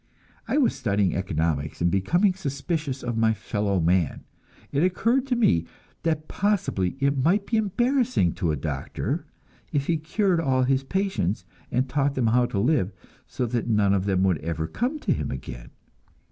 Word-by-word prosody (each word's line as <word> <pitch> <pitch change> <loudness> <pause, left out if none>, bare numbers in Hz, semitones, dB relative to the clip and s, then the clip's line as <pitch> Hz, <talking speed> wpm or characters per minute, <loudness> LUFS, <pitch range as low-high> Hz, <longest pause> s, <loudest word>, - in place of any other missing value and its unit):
I - - +1
was 275 -5 +3
studying 100 -3 0
economics, 80 -5 -1
and 85 0 +2
becoming 175 - +2
suspicious 145 -3 -3
of 120 -2 -2
my 110 0 +3
fellow 105 -3 -1
man; 85 -1 +1 0.5
it 140 - +1
occurred 230 +9 +2
to 255 - +1
me 85 - +2 0.3
that 155 -2 -1
possibly 195 - 0
it 140 0 +1
might 195 +6 +3
be 225 - 0
embarrassing 240 - +1
to 85 - -1
a - - 0
doctor, 70 -1 -3 0.5
if 140 -1 0
he 165 +1 +1
cured 175 +3 +1
all 130 -5 +2
his 135 +1 +2
patients, 190 - -1 0.3
and 130 +2 +1
taught 140 +1 0
them 125 - +1
how 120 +2 +3
to 100 - -4
live, 110 - +2 0.4
so 125 - -2
that 120 0 -2
none 105 -3 +3
of 95 -1 +1
them 95 -2 +1
would 90 -5 +2
ever 80 0 -3
have - - -11
to - - -12
come 255 +6 +1
to 180 - +1
him - - -3
again. - - -7
130 Hz, 180 wpm, -25 LUFS, -, 0.5 s, was